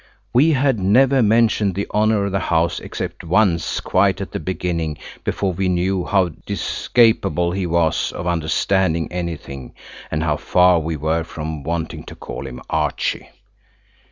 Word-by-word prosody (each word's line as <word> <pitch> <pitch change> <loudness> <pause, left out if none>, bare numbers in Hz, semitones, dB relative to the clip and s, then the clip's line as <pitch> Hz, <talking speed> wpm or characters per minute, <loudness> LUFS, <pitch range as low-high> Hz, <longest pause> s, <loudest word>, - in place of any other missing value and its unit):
We 150 +6 +5
had 135 -4 +2
never 130 +8 +4
mentioned 110 -3 +3
the 100 - -1
honour 105 -1 +2
of 100 - -2
the 100 - 0
house 85 -1 0
except - - -6
once 85 -1 +1
quite 95 0 +2
at 100 - -5
the - - -3
beginning, 85 -3 -3 0.3
before 95 -2 -1
we 95 +1 -1
knew 90 +1 0
how 95 -3 +2 0.2
discapable 100 -2 +2
he 95 0 -2
was 85 -1 +1
of - - -6
understanding 85 0 0
anything, 85 -7 -6 0.3
and 75 +1 -1
how 75 -2 0
far 90 0 +4
we 80 0 -3
were 80 +2 0
from 80 -1 -6
wanting 80 +2 -4
to - - -10
call - - -7
him 60 - -8
Archie. - - -1
90 Hz, 155 wpm, -20 LUFS, 80-100 Hz, 0.3 s, We